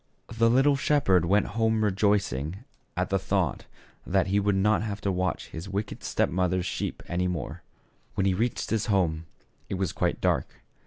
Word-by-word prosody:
The 115 0 +4
little 135 +4 +4
shep 145 +1 +1
herd 90 -3 +5
went 100 +4 +3
home 110 0 +1
rejoicing 100 - 0 0.3
at - - -1
the - - +2
thought - - -1 0.4
that 95 0 +1
he 100 +1 +1
would 100 0 +1
not 105 +3 +3
have 105 -2 -3
to 100 - 0
watch 90 -3 -2
his 85 +5 -7
wicked 100 +2 -4
step - - +1
mother's 90 +1 0
sheep - - -3
any 90 +1 0
more. 90 -3 -4 0.5
When 95 - +1
he 95 - +3
reached 115 +6 -1
his 110 -1 0
home, 85 -6 +1 0.4
it - - -2
was 95 -3 -1
quite - - 0
dark. - - -1
100 Hz, 180 wpm, -27 LUFS, 90-110 Hz, 0.5 s, herd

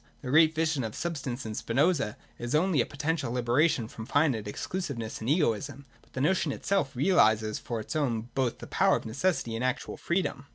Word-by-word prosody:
— - - -34
The 125 - -3
great 160 +1 +5
vision 160 -4 +1
of 110 -2 -5
substance 140 -7 -4
in 110 - -4
Spinoza 130 +1 +1 0.2
is 120 +4 -2
only 165 -3 +3
a - - -2
potential 145 -3 -2
liberation 125 +1 +2
from 110 0 -9
finite 140 -8 +1
exclusiveness 120 - -4
and 110 - -2
egoism: 140 - 0 0.2
but - - -28
the 130 - -3
notion 185 +7 +2
itself 195 -9 -1
realises 110 - +3
for 120 -2 -4
its 110 - -6
own 120 -8 0
both 130 -3 0
the - - -9
power - - +3
of - - -4
necessity 120 +1 -1
and 115 - -3
actual 130 0 -2
freedom. 170 -5 -2
135 Hz, 195 wpm, -29 LUFS, 115-160 Hz, 0.2 s, great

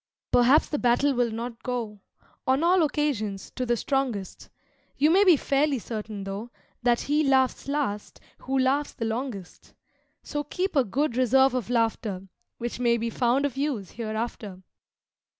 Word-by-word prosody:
Perhaps 255 +5 +5
the 295 - -1
battle 250 +4 +3
will 245 -2 +1
not 230 +1 -6
go, 230 -5 -4 0.5
On 265 +4 +2
all 355 +1 +4
occasions, 265 - -1
to 255 -1 -4
the 240 0 +2
strongest; 245 -8 -2 0.5
You 300 +3 +4
may 385 +4 +6
be 360 -6 +6
fairly 280 +1 +1
certain 215 -3 -6
tho' 200 +4 -6 0.3
That 240 -1 +2
He 300 +2 +1
Laughs 265 -2 +2
Last 275 -8 -3 0.2
who 270 +1 -2
laughs 270 +3 +1
the 230 - -4
Longest. 225 -5 -5 0.5
So 295 0 -3
keep 360 +5 -3
a 275 - +5
good 245 +4 -1
reserve 265 +1 +4
of 250 -3 -2
laughter, 225 -5 -1 0.3
Which 240 +1 -5
may 235 -1 +3
be 230 0 -3
found 250 +4 +1
of 270 -2 -3
use 270 -10 -2
hereafter. 215 -4 -5
245 Hz, 155 wpm, -26 LUFS, 225-280 Hz, 0.5 s, may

